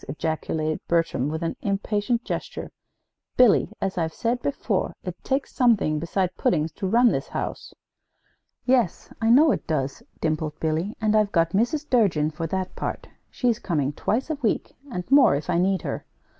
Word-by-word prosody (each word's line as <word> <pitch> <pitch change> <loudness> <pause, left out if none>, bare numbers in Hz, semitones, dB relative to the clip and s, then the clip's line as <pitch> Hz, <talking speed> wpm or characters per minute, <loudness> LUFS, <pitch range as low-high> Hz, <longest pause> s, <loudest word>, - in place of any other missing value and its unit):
ejaculated 155 +1 -2
Bertram, 165 -5 +1
with 160 +2 -3
an 165 - -2
impatient 210 +4 -1
gesture. - - -5 0.7
"Billy, 245 -5 +5
as 190 -1 -2
I've 160 -1 -2
said 240 +1 -1
before, 280 - -1
it - - -5
takes 270 +1 -1
something 215 - +3
besides 180 +3 -1
puddings 160 -1 +1
to 190 - -4
run 235 +4 +5
this - - -2
house." - - -5 0.9
"Yes, 245 -8 +1
I 225 - +2
know 290 +6 +7
it - - -3
does," 140 -4 -2 0.2
dimpled 155 -1 -2
Billy, 160 +6 -1
"and 215 -1 +2
I've 210 -1 +3
got 165 -2 +2
Mrs. 280 - 0
Durgin 175 - +2
for 165 +1 -4
that 185 +2 -3
part. - - -4 0.2
She's 240 -3 0
coming 150 - -1
twice 250 - -1
a - - 0
week, 225 - -1
and 180 -7 -4
more, 275 - +7
if 150 +5 -2
I 170 - +2
need 190 -1 +1
her. - - -4
190 Hz, 170 wpm, -25 LUFS, 160-235 Hz, 0.9 s, know